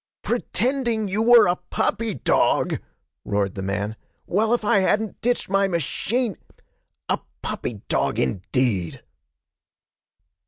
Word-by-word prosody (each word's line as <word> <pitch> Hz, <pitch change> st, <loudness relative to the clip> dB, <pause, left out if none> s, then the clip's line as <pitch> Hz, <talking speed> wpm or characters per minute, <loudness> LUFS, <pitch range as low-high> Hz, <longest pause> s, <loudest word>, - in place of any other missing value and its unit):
'Pretending 240 Hz, -1 st, 0 dB
you 200 Hz, +3 st, -1 dB
were 235 Hz, +1 st, +7 dB
a 175 Hz, -, +2 dB
puppy 225 Hz, -2 st, 0 dB
dog!' 125 Hz, -, +2 dB, 0.4 s
roared 100 Hz, -2 st, -1 dB
the 95 Hz, -, -5 dB
man. 100 Hz, +3 st, -2 dB, 0.3 s
'Well, 215 Hz, +4 st, +1 dB
if 240 Hz, -3 st, +1 dB
I 205 Hz, -, +4 dB
hadn't 210 Hz, +3 st, 0 dB
ditched 245 Hz, +1 st, 0 dB
my 195 Hz, +1 st, +2 dB
machine! 195 Hz, -, -1 dB, 0.7 s
A -, -, 0 dB, 0.2 s
puppy 105 Hz, -5 st, -4 dB
dog, -, -, 0 dB
indeed!' 95 Hz, -, -1 dB
195 Hz, 115 wpm, -23 LUFS, -, 0.7 s, were